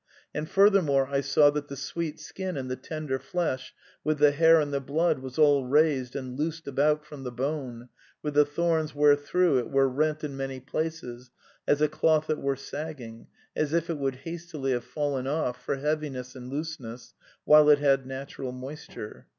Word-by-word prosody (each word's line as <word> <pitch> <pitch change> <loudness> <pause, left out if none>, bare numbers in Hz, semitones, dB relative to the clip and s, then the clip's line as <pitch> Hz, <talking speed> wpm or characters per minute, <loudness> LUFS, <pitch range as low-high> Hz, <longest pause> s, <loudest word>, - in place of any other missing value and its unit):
And 150 +1 -4
furthermore 190 -9 +4
I 140 0 0
saw 145 +1 +4
that 145 0 -4
the 140 - -7
sweet 150 +4 -4
skin 190 -4 -5
and 130 -1 -4
the - - -1
tender 135 0 -4
flesh, 140 -1 -3 0.3
with 155 +1 0
the 145 0 +5
hair 160 +2 +6
and 145 -2 -1
the 140 - +1
blood, 155 +3 0
was 130 -1 -8
all 145 -3 +5
raised 140 -3 +2
and 130 -2 -5
loosed 160 +3 -3
about 150 +2 +1
from 150 -2 -10
the 125 - -4
bone, 125 -2 -4 0.4
with 150 - -2
the 150 +1 +6
thorns 160 +1 -1
where 145 0 +6
through 145 0 +2
it 120 - -4
were 135 0 +3
rent 155 +4 0
in 145 -2 -4
many 135 -1 -4
pieces, 130 -3 -5 0.4
as 145 +1 +3
a - - +5
cloth 155 +1 +2
that 155 - -1
were 140 0 0
sagging, 135 -5 -8 0.3
as 155 0 -1
if 170 +1 +1
it 155 - -4
would 135 -1 -1
hastily 165 -5 -4
have 120 -1 -1
fallen 140 -1 -2
off, 125 -4 -2
for - - -1
heavi 150 +2 -1
ness 125 0 -7
and 125 -1 -9
looseness, 140 -5 -6 0.3
while 150 0 +7
it 145 - +7
had 135 -2 +2
natural 135 -1 -6
moisture. 130 -3 -9
145 Hz, 190 wpm, -27 LUFS, 130-155 Hz, 0.4 s, while